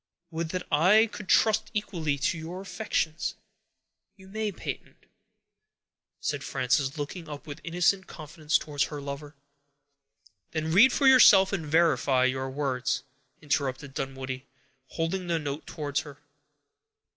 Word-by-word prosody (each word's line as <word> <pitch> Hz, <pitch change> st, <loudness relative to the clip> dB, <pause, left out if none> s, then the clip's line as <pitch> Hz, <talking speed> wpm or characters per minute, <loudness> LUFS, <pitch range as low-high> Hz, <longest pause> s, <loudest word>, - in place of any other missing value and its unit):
Would 165 Hz, 0 st, -3 dB
that 180 Hz, +1 st, -4 dB
I 190 Hz, +9 st, +6 dB
could 210 Hz, -3 st, -9 dB
trust 220 Hz, 0 st, +3 dB
equally 170 Hz, -8 st, -1 dB
to 140 Hz, +6 st, 0 dB
your 170 Hz, +3 st, -6 dB
affections!" 170 Hz, -5 st, -2 dB, 0.8 s
"You 190 Hz, -1 st, -16 dB
may, 215 Hz, +1 st, -2 dB
Peyton," 180 Hz, -, -7 dB, 1.2 s
said -, -, -3 dB
Frances, 130 Hz, +2 st, 0 dB
looking 155 Hz, +3 st, -6 dB
up 145 Hz, +1 st, -8 dB
with 150 Hz, 0 st, -8 dB
innocent 180 Hz, +3 st, +1 dB
confidence 155 Hz, 0 st, -1 dB
towards 145 Hz, -2 st, -1 dB
her 150 Hz, -, -6 dB
lover. 140 Hz, +1 st, -7 dB, 1.2 s
"Then 160 Hz, 0 st, -2 dB
read 220 Hz, +10 st, +7 dB
for 280 Hz, -, +1 dB
yourself, 225 Hz, -7 st, +7 dB
and 165 Hz, -6 st, -2 dB
verify 145 Hz, -5 st, +3 dB
your 130 Hz, +1 st, -1 dB
words," 130 Hz, -2 st, -1 dB, 0.4 s
interrupted 140 Hz, -1 st, -2 dB
Dunwoodie, 130 Hz, 0 st, -5 dB, 0.4 s
holding 175 Hz, +5 st, -3 dB
the 170 Hz, -1 st, +1 dB
note 145 Hz, -1 st, -5 dB
towards 145 Hz, -3 st, -2 dB
her. 145 Hz, -3 st, -9 dB
155 Hz, 130 wpm, -27 LUFS, 140-185 Hz, 1.2 s, read